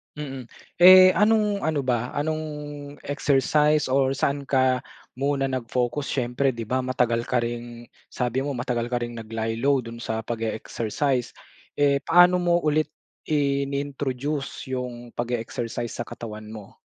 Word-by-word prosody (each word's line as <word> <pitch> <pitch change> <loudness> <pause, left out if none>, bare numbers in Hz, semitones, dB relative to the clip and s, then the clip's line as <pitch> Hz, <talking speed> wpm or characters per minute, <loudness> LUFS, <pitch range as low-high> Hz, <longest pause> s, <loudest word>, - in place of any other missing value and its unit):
Mm. 135 -4 -6 0.3
Eh 185 +1 +9
anong-ano 210 -6 +2
ba 125 0 0
anong 155 +2 -2 0.6
exercise 150 +1 +2
or 135 0 +2
saan 140 +1 -1
ka 130 -2 +2 0.3
muna 135 +1 0
nag-focus 125 +1 -2
siyempre 130 +1 0
di 115 -3 -7
ba 130 +2 0
matagal 120 -2 +1
ka 125 0 0
ring 120 0 -5 0.2
sabi 125 +1 -1
mo 145 - -2
matagal 120 -1 -2
ka 120 - +1
ring 120 0 -5
nag 115 -1 -9
lie-low 115 +5 +1
dun 115 -1 -8
sa 110 0 -2
pag-e-exercise. 115 +3 -2 0.5
Eh 140 -1 +3
paano 175 +1 +5
mo 175 0 +3
ulit 155 -1 0 0.4
in-introduce 140 -1 -2
yung 120 -2 -6
pag-e-exercise 120 0 -3
sa - - -3
katawan 110 -2 -8
mo? 105 -3 -10
130 Hz, 130 wpm, -25 LUFS, 120-145 Hz, 0.6 s, Eh